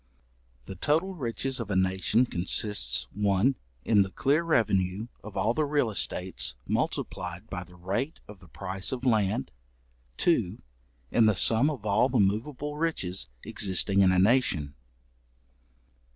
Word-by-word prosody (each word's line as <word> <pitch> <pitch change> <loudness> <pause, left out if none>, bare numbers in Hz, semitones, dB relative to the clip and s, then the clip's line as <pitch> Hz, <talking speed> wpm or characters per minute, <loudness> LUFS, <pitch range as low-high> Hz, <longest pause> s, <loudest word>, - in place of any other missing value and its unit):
The 95 - -7
total 155 - 0
Riches 130 - -3
of 115 -3 -5
a 100 - -1
nation 95 +5 +2
consists, 90 - 0
1. 100 +5 +2 0.3
in 105 -3 +4
the 95 - 0
clear 140 - +1
revenue 105 - +1
of 105 - -9
all 115 - +2
the 155 - +1
real 145 -6 +1
estates, 75 -12 -2
multiplied 90 +4 -3
by 90 -1 -4
the 90 0 -17
rate 100 - -3
of 105 -2 -12
the 90 - -16
price 95 +3 -5
of 130 0 -4
land. 105 - +1 0.7
2. 110 - +1 0.5
in 115 -2 +4
the 110 - +3
sum 115 +9 +3
of 130 -9 -6
all 110 +5 +3
the 130 - +1
moveable 125 +9 -1
riches 95 - -1
existing 100 +1 +2
in 95 -1 +5
a 95 - +2
nation. 95 - +2
105 Hz, 145 wpm, -28 LUFS, 95-130 Hz, 0.7 s, in